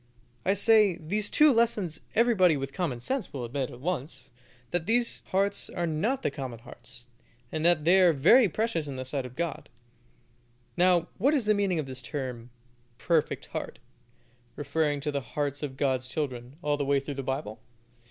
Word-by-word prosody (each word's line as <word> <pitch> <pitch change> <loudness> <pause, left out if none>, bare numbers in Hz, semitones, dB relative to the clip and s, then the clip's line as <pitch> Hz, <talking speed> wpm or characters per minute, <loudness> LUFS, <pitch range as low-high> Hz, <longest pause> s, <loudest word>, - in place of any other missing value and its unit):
I 195 - +2
say, 210 -3 +5
these 200 +6 -2
two 300 -2 +5
lessons 215 -9 0
everybody 200 -9 +4
with 135 0 -5
common 165 -10 -2
sense 255 - -3
will 130 -4 -4
admit 130 +2 -3
at 120 - -11
once 135 -5 -4 0.4
that 175 -2 -2
these 235 +1 +1
hearts 200 +1 0
are 175 - -2
not 210 - -1
the - - 0
common 130 -4 -6
hearts, 120 +1 -13 0.4
and 155 - -3
that 170 -3 +3
they 185 +3 +6
are 180 -2 +6
very 185 - +5
precious 175 -6 -1
in 140 - -5
the 130 0 -5
sight 130 0 -3
of 125 - -15
God. 170 -1 -4 1.1
Now, 180 -1 +3
what 275 +9 +3
is 260 -7 0
the 215 - +4
meaning 200 -4 0
of 155 - -1
this 130 -1 -8
term 125 -2 -5 0.5
"perfect 160 +2 0
heart," - - -5 0.8
referring 145 0 -1
to 150 +1 -2
the 140 -1 -2
hearts 145 +3 -3
of 135 -3 -5
God's 130 -2 0
children, 130 -3 -4
all 145 0 +1
the 145 - -1
way 140 0 +2
through 140 +1 -6
the 135 - -4
Bible? 130 -5 -4
155 Hz, 180 wpm, -28 LUFS, 135-190 Hz, 1.1 s, they